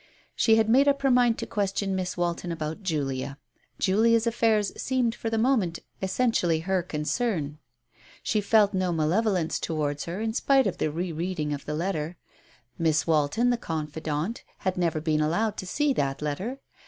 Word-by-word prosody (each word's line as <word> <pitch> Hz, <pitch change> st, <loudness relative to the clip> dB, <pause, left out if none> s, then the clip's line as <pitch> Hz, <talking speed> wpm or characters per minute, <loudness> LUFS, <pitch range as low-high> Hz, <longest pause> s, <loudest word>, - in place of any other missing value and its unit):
She 225 Hz, -, +4 dB
had 220 Hz, -1 st, +3 dB
made 265 Hz, +5 st, +5 dB
up 280 Hz, 0 st, +2 dB
her 270 Hz, -, +4 dB
mind 245 Hz, -2 st, +4 dB
to -, -, -4 dB
question 200 Hz, -1 st, -1 dB
Miss 185 Hz, -1 st, -3 dB
Walton 175 Hz, 0 st, -1 dB
about 160 Hz, +1 st, -4 dB
Julia. 140 Hz, -6 st, -2 dB, 0.4 s
Julia's 225 Hz, +4 st, +3 dB
affairs 225 Hz, -3 st, +2 dB
seemed 255 Hz, -3 st, 0 dB
for 230 Hz, -, -4 dB
the 225 Hz, -, -1 dB
moment 220 Hz, -8 st, +2 dB, 0.2 s
essentially 190 Hz, -5 st, +1 dB
her 190 Hz, +2 st, 0 dB
concern. 155 Hz, -, -2 dB, 0.6 s
She 215 Hz, -, +1 dB
felt 205 Hz, 0 st, +4 dB
no 185 Hz, -1 st, 0 dB
malevolence 170 Hz, +2 st, +1 dB
to 165 Hz, -, -3 dB
wards 145 Hz, -1 st, -1 dB
her 170 Hz, +4 st, -4 dB
in 220 Hz, 0 st, -1 dB
spite 270 Hz, +2 st, +3 dB
of 195 Hz, -, -2 dB
the -, -, +1 dB
re 170 Hz, +4 st, -3 dB
reading 160 Hz, -2 st, -2 dB
of 145 Hz, -, -6 dB
the 150 Hz, -, -3 dB
letter. 165 Hz, -1 st, -2 dB, 0.6 s
Miss 160 Hz, -2 st, +2 dB
Walton, 165 Hz, +10 st, +2 dB
the 245 Hz, -, +1 dB
confidante, 155 Hz, +2 st, -3 dB, 0.2 s
had 185 Hz, -1 st, +1 dB
never 170 Hz, -3 st, 0 dB
been 155 Hz, -1 st, +1 dB
allowed 200 Hz, +8 st, +1 dB
to 185 Hz, -, -5 dB
see 295 Hz, +8 st, +1 dB
that 135 Hz, -, -1 dB
letter. 190 Hz, -, -3 dB
185 Hz, 175 wpm, -27 LUFS, 155-225 Hz, 0.6 s, made